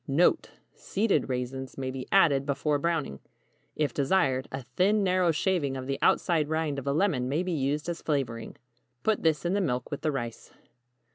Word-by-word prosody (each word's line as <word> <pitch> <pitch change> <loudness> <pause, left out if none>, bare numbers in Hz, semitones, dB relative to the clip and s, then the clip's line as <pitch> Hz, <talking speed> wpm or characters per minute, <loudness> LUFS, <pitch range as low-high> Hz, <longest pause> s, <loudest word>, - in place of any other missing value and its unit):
NOTE. 170 - +3 0.2
Seeded 205 -5 0
raisins 130 +1 -4
may 130 -1 -3
be 130 -1 -6
added 150 -8 +5
before 145 +1 0
browning. 155 - -1 0.6
If 145 -5 0
desired, 135 -3 +1
a 130 0 -5
thin 190 - +1
narrow 185 -2 +2
shaving 160 -4 0
of 130 - -5
the 135 0 -3
outside 160 -4 +2
rind 155 -3 -1
of 135 - -9
a - - +2
lemon 145 -6 +1
may 155 +6 0
be 185 - -3
used 150 0 -1
as 170 -1 -4
flavoring. 125 -7 -2 0.5
Put 220 -1 +1
this 160 0 +1
in 175 - +1
the 200 - +1
milk 125 -7 -2
with 145 - -4
the 155 - 0
rice. 120 -5 -5
145 Hz, 185 wpm, -28 LUFS, 135-175 Hz, 0.6 s, added